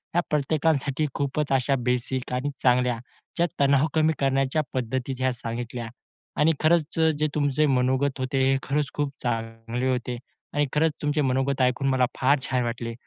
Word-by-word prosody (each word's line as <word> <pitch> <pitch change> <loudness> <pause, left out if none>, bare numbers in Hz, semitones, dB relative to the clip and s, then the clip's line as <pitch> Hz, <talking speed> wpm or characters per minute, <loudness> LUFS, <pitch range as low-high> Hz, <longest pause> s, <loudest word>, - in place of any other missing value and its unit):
या 175 - +4
प्रत्येकांसाठी 150 -1 +1
खूपच 145 +1 -1
अशा 135 +1 +2
बेसिक 125 +1 -1
आणि 130 +3 -1
चांगल्या 125 -1 +3 0.4
ज्या 170 - +3
तणाव 140 +1 +4
कमी 160 0 +3
करण्याच्या 135 +2 +1
पद्धती 130 +1 -2
ज्या 130 0 0
सांगितल्या. 120 0 -5 0.5
आणि 155 +2 +4
खरंच 160 0 +2
अ, 160 0 +5
जे 155 - +2
तुमचे 145 0 +2
मनोगत 130 +2 +1
होते. 130 +1 0
हे 135 - +3
खरंच 145 0 0
खूप 145 -1 -1
चांगले 115 +1 -2
होते 125 -1 -2 0.4
आणि 145 0 +2
खरंच 160 +2 +3
तुमचे 150 0 +1
मनोगत 135 0 0
ऐकून 125 +2 +2
मला 130 -1 +3
फार 135 +2 +4
छान 125 -1 +1
वाटले. 115 0 -3
135 Hz, 160 wpm, -25 LUFS, 125-145 Hz, 0.5 s, अ